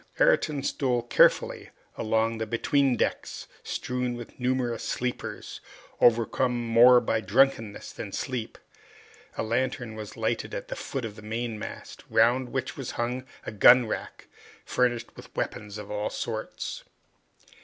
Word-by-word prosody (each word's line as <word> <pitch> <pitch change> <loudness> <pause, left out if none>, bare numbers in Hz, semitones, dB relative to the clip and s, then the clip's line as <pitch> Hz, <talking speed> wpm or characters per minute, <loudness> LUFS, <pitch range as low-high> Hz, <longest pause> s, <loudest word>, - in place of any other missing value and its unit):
Ayrton 330 - +3
stole 125 -4 0
carefully 120 - +3 0.3
along 110 +1 0
the 110 - -2
between 135 +4 +2
decks, - - -2
strewn 125 -1 -2
with 120 +1 -10
numerous 125 -2 0
sleepers, 125 0 -4 0.4
overcome 120 +1 +3
more 120 +2 +7
by 110 -2 0
drunkenness 115 0 +1
than 100 - -7
sleep. 120 +1 -4 0.8
A - - 0
lantern 125 +1 -1
was 110 -1 -8
lighted - - -1
at - - -6
the - - -3
foot 135 -3 -4
of 105 -2 -6
the - - -10
mainmast, 110 0 -5
round 120 +3 +3
which 130 0 -3
was 135 -3 -5
hung 125 +2 -2 0.2
a - - -4
gun 120 +4 +7
rack, 110 - -5 0.4
furnished 120 -2 0
with - - -12
weapons 105 0 -4
of 105 -1 -8
all 105 0 -1
sorts. - - -5
120 Hz, 135 wpm, -27 LUFS, 110-125 Hz, 0.8 s, more